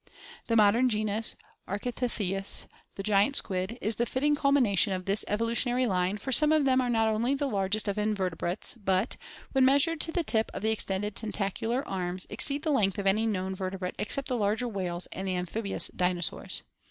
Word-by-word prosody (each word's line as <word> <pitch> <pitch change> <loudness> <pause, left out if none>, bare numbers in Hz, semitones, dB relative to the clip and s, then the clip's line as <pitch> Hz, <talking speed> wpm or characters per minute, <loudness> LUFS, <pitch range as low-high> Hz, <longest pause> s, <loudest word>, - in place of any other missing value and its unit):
The 230 - +1
modem 225 +4 +5
genus 215 0 -2 0.3
Architeuthts 245 +5 -2
(Fig. 190 -4 -1 0.3
117), - - -27 0.3
the 195 - -5
giant 210 +6 +3
squid, 190 +2 -2
is 215 +1 0
the 235 - 0
fitting 290 +3 +1
culmination 255 -9 +3
of 185 -1 -4
this 200 +2 +1
evolu 230 +3 0
tionary 245 +1 +1
line, 185 0 0
for 265 - -5
some 300 +4 +6
of 310 -2 +3
them 260 -1 +4
are 250 - -1
not 225 -2 +2
only 230 +5 +1
the 285 +1 -1
largest 205 -2 0
of 200 +1 -1
invertebrates, 190 -4 0
but, 195 -1 0 0.4
when 265 -1 +3
measured 285 +5 +4
to 325 - +3
the 345 0 0
tip 220 -6 0
of - - -5
the 220 - +2
extended 205 -1 -2
tentacular 225 +4 -2
arms, 185 -1 -3
ex - - -1
„ - - +1
ceed 285 +2 -3
the 315 - +1
length 200 -9 +2
of 200 - -3
any 215 +4 +3
known 190 -3 -1
ver 190 0 -3
x 185 - -5
tebrate 180 -1 -4
except 275 +5 0
the 255 - -1
larger 220 +3 0
whales 185 -5 -3
> - - -19
and 190 +1 -5
the 185 - 0
amphibious 195 +4 -1
dinosaurs. 180 -2 -1
215 Hz, 215 wpm, -29 LUFS, 195-250 Hz, 0.4 s, some